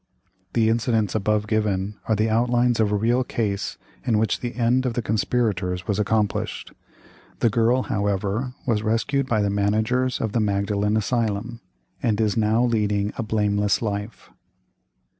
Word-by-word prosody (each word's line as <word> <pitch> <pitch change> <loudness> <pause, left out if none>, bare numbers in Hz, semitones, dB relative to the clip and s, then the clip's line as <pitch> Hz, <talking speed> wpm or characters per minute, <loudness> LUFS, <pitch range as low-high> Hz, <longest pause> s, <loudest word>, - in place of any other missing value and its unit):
"The 115 -2 +3
incidents 115 -2 +1
above 105 0 +1
given 105 -2 -1
are 110 - +2
the 110 +2 +1
outlines 120 +1 +2
of 105 -2 +2
a - - +2
real 120 +5 +2
case 105 -5 -2 0.3
in 115 -3 +1
which 110 +1 +1
the 120 -2 -5
end 125 +2 +2
of 120 - -3
the 120 - 0
conspirators 100 -5 -1
was 105 0 0
accomplished; 105 0 -1 0.6
the 115 - +2
girl, 120 +3 +2
however, 100 +5 -1
was 115 -4 +1
rescued 115 +5 0
by 110 -4 +1
the 100 - 0
Managers 110 +5 +1
of 110 - -2
the 115 - 0
Magdalen 105 0 0
Asylum, 115 +1 -1 0.4
and 110 -2 +1
is 110 -2 +1
now 110 +1 +2
leading 105 -3 0
a - - -3
blameless 105 -2 +1
life." 105 0 -5
110 Hz, 155 wpm, -23 LUFS, 105-115 Hz, 0.6 s, The